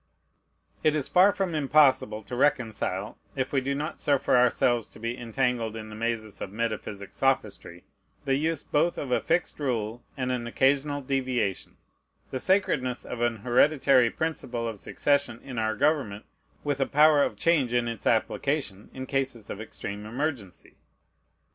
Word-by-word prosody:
It 155 Hz, 0 st, +3 dB
is 145 Hz, -3 st, 0 dB
far 185 Hz, +3 st, +5 dB
from 195 Hz, -4 st, -2 dB
impossible 135 Hz, -7 st, +3 dB
to 125 Hz, -, -6 dB
reconcile, 115 Hz, -7 st, 0 dB, 0.2 s
if 135 Hz, 0 st, -2 dB
we 135 Hz, -, +2 dB
do 140 Hz, +1 st, -1 dB
not 150 Hz, +3 st, -4 dB
suffer 140 Hz, -3 st, +2 dB
ourselves 120 Hz, -2 st, +3 dB
to -, -, -14 dB
be 115 Hz, +2 st, -3 dB
entangled 120 Hz, -2 st, -1 dB
in 110 Hz, -1 st, -7 dB
the 105 Hz, -, -9 dB
mazes 110 Hz, -2 st, -3 dB
of 95 Hz, -, -5 dB
metaphysic 105 Hz, -3 st, -4 dB
sophistry, 110 Hz, -9 st, -1 dB, 0.4 s
the 135 Hz, -, +1 dB
use 155 Hz, +2 st, 0 dB
both 165 Hz, +4 st, +1 dB
of 135 Hz, -, -4 dB
a -, -, +2 dB
fixed 175 Hz, -, 0 dB
rule 120 Hz, -4 st, -2 dB, 0.2 s
and 130 Hz, -1 st, -1 dB
an 120 Hz, -2 st, -2 dB
occasional 140 Hz, +4 st, +1 dB
deviation, 130 Hz, -7 st, -2 dB, 0.5 s
the 130 Hz, -, -2 dB
sacredness 130 Hz, -9 st, +1 dB
of 120 Hz, -, -6 dB
an 120 Hz, -1 st, +1 dB
hereditary 130 Hz, -1 st, +4 dB
principle 125 Hz, -6 st, -3 dB
of 110 Hz, -3 st, -5 dB
succession 140 Hz, -3 st, 0 dB
in 125 Hz, -4 st, -5 dB
our 110 Hz, 0 st, 0 dB
government 110 Hz, -5 st, 0 dB, 0.4 s
with 145 Hz, -2 st, -1 dB
a 135 Hz, -, +2 dB
power 150 Hz, 0 st, +5 dB
of -, -, +1 dB
change 160 Hz, -8 st, +2 dB
in 120 Hz, -1 st, +1 dB
its 115 Hz, -3 st, -4 dB
application 115 Hz, -2 st, 0 dB
in 130 Hz, 0 st, -5 dB
cases 130 Hz, -5 st, -2 dB
of 100 Hz, -, -6 dB
extreme 105 Hz, -1 st, -7 dB
emergency. 125 Hz, -, -5 dB
125 Hz, 160 wpm, -27 LUFS, 115-145 Hz, 0.5 s, far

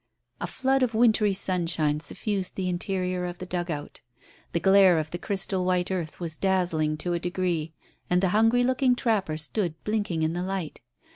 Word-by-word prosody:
A -, -, -3 dB
flood 270 Hz, +1 st, +1 dB
of 245 Hz, -3 st, +1 dB
wintry 220 Hz, -2 st, +4 dB
sunshine 170 Hz, -5 st, 0 dB
suffused 195 Hz, +3 st, -3 dB
the 190 Hz, -1 st, -2 dB
interior 180 Hz, 0 st, -2 dB
of 175 Hz, 0 st, -6 dB
the 185 Hz, -, -7 dB
dugout. 175 Hz, -5 st, -4 dB, 0.5 s
The 170 Hz, -, 0 dB
glare 190 Hz, -1 st, +6 dB
of 155 Hz, 0 st, -2 dB
the 175 Hz, -, -4 dB
crystal 190 Hz, 0 st, 0 dB
white 180 Hz, 0 st, 0 dB
earth 170 Hz, -4 st, -4 dB
was 165 Hz, -3 st, -3 dB
dazzling 175 Hz, -5 st, +1 dB
to 175 Hz, +3 st, -2 dB
a 170 Hz, -, 0 dB
degree, 175 Hz, -3 st, -2 dB, 0.3 s
and 180 Hz, -, +3 dB
the 190 Hz, 0 st, +2 dB
hungry 225 Hz, +5 st, +3 dB
looking 255 Hz, 0 st, +2 dB
trapper 205 Hz, -10 st, 0 dB
stood 165 Hz, +1 st, -1 dB
blinking 205 Hz, -7 st, -1 dB
in 160 Hz, +1 st, 0 dB
the 175 Hz, -, -2 dB
light. 185 Hz, -3 st, -4 dB
180 Hz, 175 wpm, -26 LUFS, 170-200 Hz, 0.5 s, glare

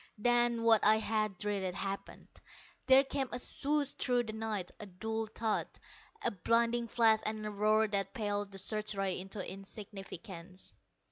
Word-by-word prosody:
Then, 240 Hz, +1 st, +2 dB
what 225 Hz, -2 st, +5 dB
I 215 Hz, +1 st, +7 dB
had 215 Hz, -3 st, -1 dB
dreaded, 195 Hz, -2 st, -2 dB
happened. 195 Hz, 0 st, -5 dB, 0.6 s
There 265 Hz, +1 st, +8 dB
came 270 Hz, -1 st, -2 dB
a -, -, -2 dB
swoosh 285 Hz, +3 st, +2 dB
through 245 Hz, -2 st, +1 dB
the 220 Hz, -2 st, -6 dB
night, 215 Hz, -4 st, -3 dB
a 210 Hz, -, -7 dB
dull 220 Hz, +4 st, -3 dB
thud, 220 Hz, 0 st, -1 dB, 0.6 s
a -, -, +1 dB
blinding 235 Hz, +4 st, +1 dB
flash 225 Hz, -1 st, +4 dB
and 215 Hz, -1 st, -3 dB
roar 215 Hz, +2 st, +3 dB
that 195 Hz, -2 st, -1 dB
paled 205 Hz, -2 st, -2 dB
the 195 Hz, -, -9 dB
search 215 Hz, +2 st, 0 dB
rays 195 Hz, -2 st, -1 dB
into 195 Hz, 0 st, -6 dB
insignificance. 195 Hz, -2 st, -9 dB
215 Hz, 150 wpm, -33 LUFS, 195-230 Hz, 0.6 s, There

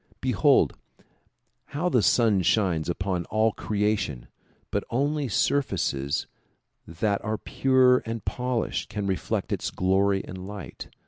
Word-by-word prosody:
Behold -, -, +3 dB, 1.0 s
how 175 Hz, +4 st, +1 dB
the 125 Hz, -9 st, +3 dB
sun 110 Hz, -4 st, +3 dB
shines 90 Hz, -4 st, +1 dB
upon 90 Hz, 0 st, -2 dB
all 110 Hz, +1 st, +2 dB
creation 100 Hz, -, -2 dB, 0.4 s
but -, -, 0 dB
only 145 Hz, +3 st, 0 dB
surfaces 70 Hz, -, 0 dB, 0.6 s
that 100 Hz, +5 st, -1 dB
are 110 Hz, 0 st, -2 dB
pure 130 Hz, 0 st, +3 dB
and 115 Hz, -1 st, -6 dB
polished 125 Hz, -2 st, -2 dB
can 105 Hz, -2 st, -3 dB
reflect 95 Hz, -1 st, -2 dB
its -, -, -2 dB
glory 95 Hz, +1 st, +1 dB
and 95 Hz, 0 st, -8 dB
light. 100 Hz, -2 st, -8 dB
105 Hz, 120 wpm, -26 LUFS, 95-120 Hz, 1.0 s, Behold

